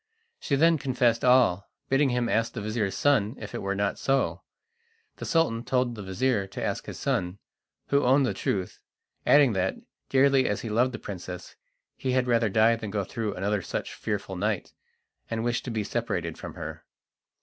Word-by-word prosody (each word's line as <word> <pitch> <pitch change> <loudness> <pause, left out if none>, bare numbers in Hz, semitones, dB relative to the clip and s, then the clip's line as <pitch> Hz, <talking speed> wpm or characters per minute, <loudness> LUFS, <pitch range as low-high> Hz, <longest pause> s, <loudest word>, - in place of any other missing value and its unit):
She 140 - 0
then 165 +2 +4
confessed 125 -3 +1
all, 125 -7 +4 0.2
bidding 135 +1 +3
him 125 -1 0
ask 115 0 0
the 115 - -4
vizir's 105 -2 -1
son 125 -5 +2
if 105 - -8
it - - -4
were 100 0 -1
not 100 0 -1
so. 135 0 +1 0.8
The - - -6
Sultan 160 -9 +1
told 125 -1 +1
the 110 - -7
vizir 100 +2 0
to - - -6
ask - - -2
his - - -6
son, 90 +1 -1 0.5
who 140 0 +3
owned 135 +2 +4
the 120 - 0
truth, 95 -1 -2 0.5
adding 140 -5 +6
that, 95 -1 0 0.3
dearly 135 0 +4
as 105 - -1
he 115 - -5
loved 125 +4 +2
the - - -3
princess, 90 -2 -8 0.4
he 130 -1 -2
had 130 -1 +2
rather 115 -2 +2
die 110 +3 +4
than 110 -2 -6
go 100 0 -1
through 105 +1 -3
another 100 +2 0
such - - -4
fearful - - -4
night, - - -2 0.6
and 115 0 -2
wished 120 0 -1
to - - -4
be 110 -2 -1
separated 90 -8 -2
from - - -8
her. - - -7
115 Hz, 185 wpm, -27 LUFS, 100-130 Hz, 0.8 s, adding